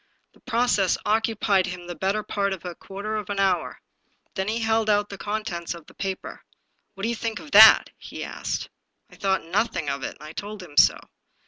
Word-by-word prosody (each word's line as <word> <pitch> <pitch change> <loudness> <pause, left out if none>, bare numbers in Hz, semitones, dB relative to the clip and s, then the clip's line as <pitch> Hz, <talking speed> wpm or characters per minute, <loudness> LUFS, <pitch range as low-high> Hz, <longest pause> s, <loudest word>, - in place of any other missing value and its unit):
The - - -23
process 235 -6 +1
occupied 215 -3 +2
him 180 -1 -7
the 175 - -6
better 195 +4 -1
part 200 -1 -1
of 185 -1 -9
a 175 - -4
quarter 205 +4 -5
of 210 -1 -5
an 200 -1 -2
hour. 190 -2 0 0.5
Then 190 0 -2
he 220 +2 0
held 220 -1 +1
out 205 0 +2
the 200 - -7
con 215 +1 -3
tents 170 -5 -4
of 170 -2 -12
the - - -17
paper. 190 -1 -5 0.5
"What 195 - -9
do 225 - +1
you - - 0
think 225 -2 -4
of 300 - -12
that?'' 220 +2 +9
he - - -8
asked. - - -4 0.4
I - - -14
thought 190 -1 0
nothing 175 -4 -1
of 140 - -4
it, - - -5
and - - -16
I 155 +1 -9
told 205 0 -7
him 155 -5 -13
so. - - +6
200 Hz, 215 wpm, -25 LUFS, 185-215 Hz, 0.5 s, that